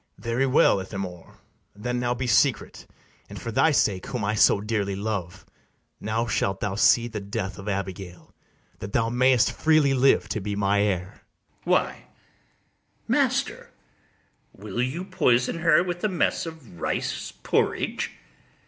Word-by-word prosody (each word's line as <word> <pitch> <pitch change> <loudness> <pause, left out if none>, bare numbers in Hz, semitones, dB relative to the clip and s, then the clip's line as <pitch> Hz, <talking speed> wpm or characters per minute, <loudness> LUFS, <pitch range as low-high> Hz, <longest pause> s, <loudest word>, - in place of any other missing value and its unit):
BARABAS. - - -19
Very 125 +4 +2
well, 130 -6 +4
Ithamore; 95 -2 -7 0.4
then 125 +4 -3
now 120 0 0
be 125 +1 -3
secret; 125 +2 +1 0.4
And, - - -8
for 115 - -5
thy 135 +8 +3
sake, 100 -10 +1
whom 120 -6 -3
I 105 - 0
so 105 - +4
dearly 100 -2 -2
love, 95 -3 -4 0.5
Now 110 +2 -1
shalt 95 -3 -1
thou 100 - -2
see 115 +3 +4
the 110 -2 -5
death 100 0 -5
of 100 +2 -6
Abigail, 95 -2 -6 0.5
That 100 +1 -7
thou 115 - +1
mayst 125 0 +3
freely 155 -3 +3
live 135 +1 +3
to 110 - -2
be 105 +1 -3
my 100 0 +2
heir. 95 -2 -2 0.4
ITHAMORE. - - -32
Why, - - +1 1.0
master, - - 0 0.8
will 105 +3 -5
you 145 +9 -2
poison 125 -6 +1
her 170 0 +4
with 175 -1 -5
a 215 - +2
mess 180 -2 0
of 135 - -11
rice - - -2
porridge? - - 0
110 Hz, 150 wpm, -25 LUFS, 100-130 Hz, 1.0 s, well